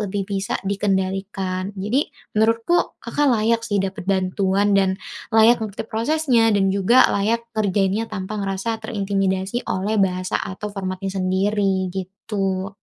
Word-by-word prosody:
lebih 200 -1 -2
bisa 195 -1 -2
dikendalikan. 195 -1 -2
Jadi 215 +10 0 0.2
menurutku, 230 +9 +2
Kakak 295 0 +1
layak 230 -1 +2
sih 205 - 0
dapat 190 0 -5
bantuan 195 +1 +1
dan 190 -1 +3 0.3
layak 225 +1 +5
ngerti 215 -1 -4
prosesnya 235 +1 +2
dan 195 -3 +2
juga 200 +6 +5
layak 225 +4 0
ngerjainnya 205 0 0
tanpa 195 +2 -4
ngerasa 200 +3 -2
terintimidasi 195 0 -1
oleh 205 +3 0
bahasa 185 -1 0
atau 205 +2 -5
formatnya 190 -1 -4
sendiri, 190 +1 +1
gitu. 195 0 -3
200 Hz, 125 wpm, -22 LUFS, 190-220 Hz, 0.3 s, layak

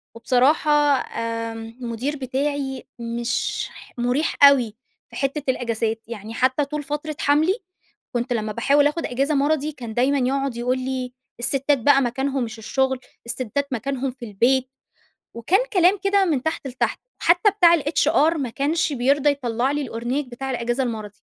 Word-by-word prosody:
وبصراحة 265 +6 +2 0.3
آمم 230 0 -5
المُدير 245 +5 -3
بتاعي 270 0 -2 0.2
مش 235 +1 -2
ح - - -15
مُريح 250 +6 0
أوي 250 -6 +6 0.3
في - - -13
حتّة 280 +1 -2
الأجازات. 225 -2 -2
يعني 220 -1 -7
حتّى 260 +4 +1
طول 300 +1 -4
فترة 295 +2 -4
حَمْلي، 315 +9 +2 0.6
كنت 240 +1 0
لمّا 215 -2 -2
باحاول 285 +6 +3
آخُد 315 +3 -2
أجازة 275 +5 0
مَرَضي 295 +1 +1
كان 235 -6 -8
دايمًا 270 +4 +2
يقعد 270 -2 -1
يقول 250 +2 0
لي: 255 -1 -3 0.3
"السِتّات 275 +4 +2
بقى 275 +3 +4
مكانهم 265 +1 -1
مش 225 0 -6
الشغل، 265 +3 0 0.3
السِتّات 255 +4 -2
مكانهم 265 +2 -2
في 245 -1 -10
البيت." 250 +5 +1 0.7
وكان 325 - +2
كلام 370 +2 +4
كده 395 0 +3
من 295 -8 0
تحت 320 -3 -2
لتحت. 255 -1 -2 0.2
حتّى 350 +5 +4
بتاع 350 -4 +5
الHR 310 +1 +2
ما 270 -5 -2
كانش 290 +5 0
بيرضى 275 +3 +2
يطلّع 250 -1 -1
لي 290 0 -1
الأورنيك 250 +3 -3
بتاع 265 +2 -5
الأجازة 240 +1 -1
المَرَضي. 215 -4 -5
265 Hz, 150 wpm, -22 LUFS, 240-290 Hz, 0.7 s, أوي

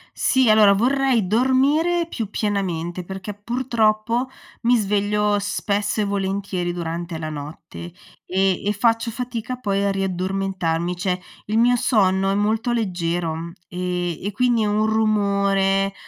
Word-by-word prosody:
Sì, 260 -3 +3
allora 215 -2 +6
vorrei 250 0 +2
dormire 275 - +2
più 225 -10 -4
pienamente 185 -5 -2
perché, 190 +3 -7
purtroppo, 230 +1 0 0.4
mi 245 +1 +4
sveglio 210 0 +1
spesso 205 +1 -1
e - - +1
volentieri 195 -3 -2
durante 170 0 -4
la 155 -1 -5
notte, 155 +3 -8 0.3
e 190 0 +1
e 205 - +2
faccio 230 +2 +1
fatica 245 0 -4
poi 200 -5 -1
a 200 - +2
riaddormentarmi, 185 -2 -1
cioè 180 0 -1 0.3
il 215 - -1
mio 245 +2 +4
sonno 195 -5 +2
è - - +1
molto 215 +4 0
leggero, 170 -6 -2 0.2
e 180 -2 -3
e 205 - -3
quindi 235 0 +2
un 210 +1 +1
rumore, 200 -3 +1
200 Hz, 130 wpm, -22 LUFS, 185-225 Hz, 0.4 s, allora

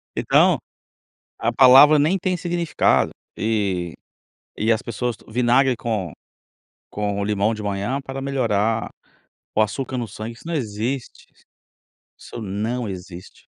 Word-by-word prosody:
Então, - - +4 0.8
a 115 - 0
palavra 135 +4 +8
nem 165 +7 +2
tem 185 0 -1
significado. 170 - +1 0.3
E 100 -6 -1 0.7
e 115 +1 +4
as 110 - -2
pessoas 120 0 -3
tomam 110 - -18
vinagre 125 +2 +3
com 105 -9 -3 0.8
com 100 -1 -2
o 100 - -1
limão 105 +1 +1
de 105 - -6
manhã 105 +6 -2
para 135 0 -6
melhorar 115 -5 0 0.7
o 110 - +4
açúcar 130 +5 -2
no 120 - -2
sangue, 110 +2 -7
isso - - -17
não 170 - -3
existe, 120 +1 -4 0.9
isso - - -9
não 110 +4 -3
existe. 90 -1 -10
115 Hz, 130 wpm, -22 LUFS, 105-135 Hz, 0.9 s, palavra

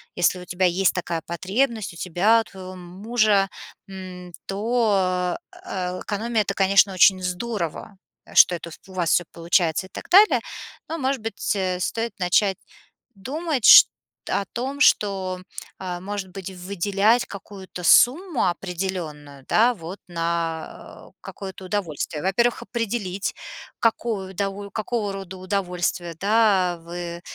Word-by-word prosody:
Если 175 +1 +2
у 180 - -10
тебя 180 +1 0
есть 180 +1 +2
такая 170 -2 -3
потребность, 210 +4 -1
у - - -12
тебя, 190 +7 +3
у - - -5
твоего 185 -2 -10
мужа, 195 +2 +1 0.4
м, 185 -2 -9
то 225 +4 0
а 185 -2 0 0.3
а, 185 - -4
экономия 220 +2 -1
это, 200 - -2
конечно, 195 0 +4
очень 185 +1 +5
здорово, 180 0 -4 0.4
что 180 - +7
это, 170 0 -7
ф 160 - -10
у 190 - -13
вас 175 -3 0
всё 175 - +4
получается 170 +1 +1
и - - -31
так - - -9
далее. 400 +4 +6 0.5
Но, 325 - -3
может 270 -3 -1
быть, 225 -1 -2
э, 185 -2 -1
стоит 225 +4 -2
начать 190 +1 +2 0.6
думать 275 - -3
шт - - +11 0.4
о 200 - +1
том, 270 +4 -4
что, 190 -5 +2 0.4
а, 180 -2 -5
может 200 0 -5
быть, 195 -1 -7
выделять 200 +5 +1
какую-то 190 -2 -9
сумму 295 - +5
определённую, 170 -7 -5
да, 235 +3 +4
вот, 185 -1 -9
на 165 -1 -4
какое-то 190 -1 -8
удовольствие? 170 -6 -3
Во-первых, 235 +6 +1
определить 220 -5 -3 0.5
какую 220 -4 0
удово 200 +1 -4
какого 215 -1 -2
рода 190 -1 -7
удовольствие, 180 -2 -2
да, 200 -4 +3
вы, 170 0 -6
190 Hz, 135 wpm, -23 LUFS, 180-215 Hz, 0.6 s, шт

